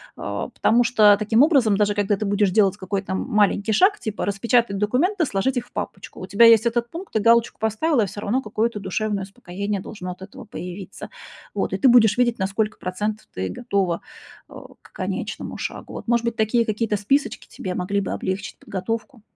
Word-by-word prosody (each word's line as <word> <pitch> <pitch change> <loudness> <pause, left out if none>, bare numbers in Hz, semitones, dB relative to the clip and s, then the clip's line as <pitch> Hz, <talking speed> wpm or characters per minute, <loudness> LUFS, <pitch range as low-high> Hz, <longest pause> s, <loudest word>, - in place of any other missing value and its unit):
А, - - -4
потому 240 +2 +2
что 215 -4 +5
таким 220 +4 +4
образом, 270 -10 +4
даже 205 0 +2
когда 205 0 +1
ты 210 - -4
будешь 200 -1 +2
делать 200 -1 +3
какой-то 190 0 -4
м 190 - -1
маленький 210 0 +2
шаг, 400 - +4
типа: 215 -1 -4
распечатать 205 +1 +1
документы, 310 - +1
сложить 255 +3 -1
их 245 0 -3
в - - -28
папочку- 190 - -6
у - - -5
тебя 200 +5 +5
есть 230 0 +7
этот 235 0 0
пункт, 355 +7 -9
ты 220 - +2
галочку 235 0 0
поставила, 230 +6 +1
и - - +2
всё 205 +2 -7
равно 235 +6 0
какое-то 215 0 -2
душевное 200 +1 -2
успокоение 200 0 -5
должно 185 -3 -7
от 180 - -11
этого 220 +6 -10
появиться. 185 -1 -8 0.4
Вот, - - -2
и - - 0
ты 275 - +3
будешь 230 -4 +6
видеть, 240 -1 +2
на 190 - +1
сколько 210 +2 -2
процентов 210 +4 -4
ты 95 0 -3
готова, 195 - -1 0.5
э, - - -14 0.3
к - - -20
конечному - - -4
шагу. - - -6
Вот, - - -8
может 235 0 +2
быть, 235 -1 -1
такие 230 +1 +2
какие-то 215 0 -1
списочки 270 +8 -1
тебе 185 - -6
могли 200 +3 -1
бы 195 - -4
облегчить 190 +2 -4
подготовку? 225 +5 -5
215 Hz, 200 wpm, -22 LUFS, 195-235 Hz, 0.5 s, есть